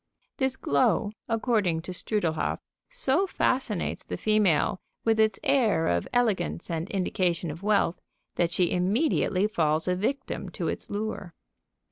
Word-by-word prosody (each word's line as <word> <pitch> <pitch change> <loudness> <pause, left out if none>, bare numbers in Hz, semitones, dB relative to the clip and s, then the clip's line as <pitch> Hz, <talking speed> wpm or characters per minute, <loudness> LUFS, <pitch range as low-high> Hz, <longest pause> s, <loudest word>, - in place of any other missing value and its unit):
This 265 -1 0
glow, 145 +9 +2 0.2
according 215 -8 +1
to 185 - -6
Strudlehoff, 175 -5 +1 0.3
so - - +1
fascinates 255 - -1
the - - -5
female 205 -5 +2 0.2
with 225 -1 +2
its 220 0 +3
air 255 - +2
of 85 0 0
elegance 195 - 0
and 165 +3 -3
indication 180 -3 -1
of 165 +4 -9
wealth, 200 -4 +1 0.3
that 170 - +1
she 175 0 +1
immediately 195 - +1
falls 160 -6 0
a 180 - +2
victim 265 +9 -3
to - - -3
its - - -5
lure. 205 -4 -4
200 Hz, 135 wpm, -27 LUFS, 170-225 Hz, 0.3 s, its